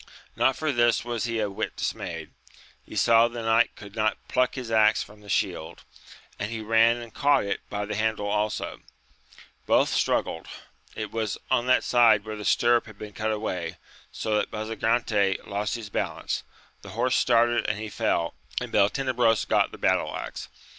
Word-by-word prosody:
Not 130 Hz, -, +3 dB
for 155 Hz, -1 st, -1 dB
this 120 Hz, -2 st, +2 dB
was 120 Hz, -2 st, -2 dB
he 115 Hz, -1 st, -2 dB
a 105 Hz, -, +1 dB
whit 100 Hz, -, -4 dB
dismayed; -, -, -4 dB, 0.5 s
he -, -, -11 dB
saw 115 Hz, 0 st, +5 dB
the 120 Hz, -1 st, -6 dB
giant 115 Hz, +1 st, +3 dB
could 100 Hz, -1 st, -12 dB
not 110 Hz, -1 st, +1 dB
pluck 125 Hz, 0 st, +1 dB
his 125 Hz, -4 st, -5 dB
axe 110 Hz, -1 st, +4 dB
from 105 Hz, 0 st, -16 dB
the 105 Hz, -, -14 dB
shield, 80 Hz, -3 st, -2 dB, 0.6 s
and 105 Hz, -, -2 dB
he 115 Hz, -1 st, -4 dB
ran 115 Hz, +2 st, +4 dB
and 120 Hz, -2 st, -9 dB
caught 145 Hz, 0 st, +3 dB
it 100 Hz, 0 st, -2 dB
by 105 Hz, 0 st, -3 dB
the 105 Hz, -, -4 dB
handle 110 Hz, -1 st, -1 dB
also; 105 Hz, +1 st, -2 dB, 0.9 s
both -, -, +4 dB
struggled; 80 Hz, -, 0 dB, 0.5 s
it -, -, -5 dB
was 110 Hz, -2 st, -2 dB
on 120 Hz, -, +2 dB
that 130 Hz, -, +4 dB
side 115 Hz, -4 st, +4 dB
where 110 Hz, 0 st, -5 dB
the 105 Hz, -1 st, -7 dB
stirrup 120 Hz, 0 st, +3 dB
had 110 Hz, -2 st, -13 dB
been 105 Hz, -1 st, -9 dB
cut 110 Hz, +2 st, -1 dB
away, 90 Hz, -6 st, -3 dB, 0.3 s
so 110 Hz, -1 st, -2 dB
that -, -, -1 dB
Basa 110 Hz, +1 st, -4 dB
gante 110 Hz, -4 st, +1 dB
lost 100 Hz, +2 st, -2 dB
his 110 Hz, -3 st, -7 dB
balance, 85 Hz, -8 st, -2 dB, 0.4 s
the -, -, -10 dB
horse 130 Hz, 0 st, +2 dB
started 120 Hz, 0 st, +3 dB
and 105 Hz, -, -1 dB
he 110 Hz, +1 st, -5 dB
fell, 85 Hz, -4 st, -1 dB, 0.3 s
and -, -, -6 dB
Beltenebros 115 Hz, +1 st, +2 dB
got -, -, +2 dB
the -, -, -10 dB
battle -, -, +1 dB
axe. -, -, -7 dB
110 Hz, 180 wpm, -26 LUFS, 105-120 Hz, 0.9 s, saw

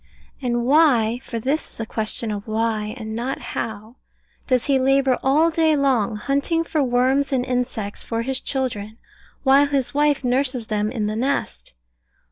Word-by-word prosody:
And 240 Hz, -2 st, -1 dB
why 250 Hz, -6 st, +4 dB
(for 235 Hz, -, -6 dB
this 275 Hz, +7 st, -2 dB
is -, -, -16 dB
a 225 Hz, -, -2 dB
question 220 Hz, 0 st, -2 dB
of 205 Hz, 0 st, -5 dB
Why, 220 Hz, 0 st, -1 dB
and 220 Hz, -2 st, -6 dB
not 245 Hz, +4 st, -2 dB
of -, -, -13 dB
How) 220 Hz, +2 st, -5 dB, 0.5 s
does 255 Hz, -3 st, +2 dB
he 275 Hz, -2 st, +2 dB
labour 270 Hz, 0 st, +2 dB
all 305 Hz, +5 st, +3 dB
day 320 Hz, -1 st, +3 dB
long, 255 Hz, -7 st, +1 dB
hunting 280 Hz, +8 st, 0 dB
for 315 Hz, -2 st, -1 dB
worms 260 Hz, +2 st, +2 dB
and 255 Hz, -2 st, +1 dB
insects 245 Hz, -5 st, -3 dB
for 230 Hz, 0 st, -2 dB
his 265 Hz, +1 st, -2 dB
children, 225 Hz, -5 st, -3 dB, 0.5 s
while 275 Hz, +1 st, +5 dB
his 280 Hz, -2 st, -1 dB
wife 290 Hz, -1 st, +2 dB
nurses 255 Hz, -1 st, 0 dB
them 210 Hz, 0 st, -1 dB
in 225 Hz, -4 st, -2 dB
the 210 Hz, +1 st, -2 dB
nest? 220 Hz, -, -2 dB
250 Hz, 170 wpm, -22 LUFS, 220-275 Hz, 0.5 s, while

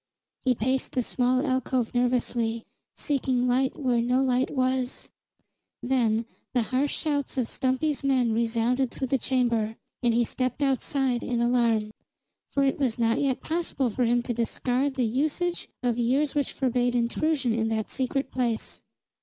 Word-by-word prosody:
He 255 Hz, -1 st, +3 dB
paced 260 Hz, +4 st, -1 dB
the 255 Hz, -, +1 dB
small 255 Hz, +3 st, +1 dB
alcove 260 Hz, -3 st, 0 dB
nervously, 240 Hz, -2 st, 0 dB, 0.3 s
seeking 260 Hz, -3 st, 0 dB
light 260 Hz, +2 st, +1 dB
where 250 Hz, -4 st, +2 dB
no 250 Hz, +2 st, +2 dB
light 255 Hz, 0 st, +1 dB
was. 255 Hz, -1 st, -1 dB, 0.7 s
Then 235 Hz, -3 st, +1 dB, 0.3 s
the 245 Hz, -, +3 dB
harsh 260 Hz, +5 st, 0 dB
shouts 285 Hz, -3 st, -1 dB
of 250 Hz, -3 st, +1 dB
Stumpy's 270 Hz, +4 st, 0 dB
men 260 Hz, -4 st, +2 dB
resounded 235 Hz, +3 st, +1 dB
through 265 Hz, -, -4 dB
the 270 Hz, -, +2 dB
chamber, 235 Hz, -4 st, 0 dB, 0.3 s
and 240 Hz, -2 st, +3 dB
he 235 Hz, +1 st, +3 dB
stepped 255 Hz, +4 st, -2 dB
outside 265 Hz, -2 st, +1 dB
in 240 Hz, -1 st, -1 dB
alarm. 235 Hz, -3 st, +2 dB, 0.6 s
For 280 Hz, -, +1 dB
it 270 Hz, +1 st, +1 dB
was 255 Hz, -5 st, 0 dB
not 230 Hz, -1 st, +2 dB
yet 270 Hz, -3 st, 0 dB
possible 320 Hz, -7 st, -1 dB
for 250 Hz, -, 0 dB
him 240 Hz, +1 st, +2 dB
to 240 Hz, -, -2 dB
discard 250 Hz, +4 st, 0 dB
the 255 Hz, -2 st, +1 dB
usage 305 Hz, +9 st, -1 dB
of 240 Hz, -1 st, +1 dB
years 270 Hz, +5 st, +2 dB
which 290 Hz, -3 st, 0 dB
forbade 245 Hz, -2 st, 0 dB
intrusion 245 Hz, +2 st, +1 dB
in 225 Hz, 0 st, 0 dB
that 220 Hz, -1 st, -2 dB
secret 270 Hz, +1 st, -1 dB
place. 240 Hz, -3 st, -2 dB
250 Hz, 155 wpm, -26 LUFS, 235-265 Hz, 0.7 s, He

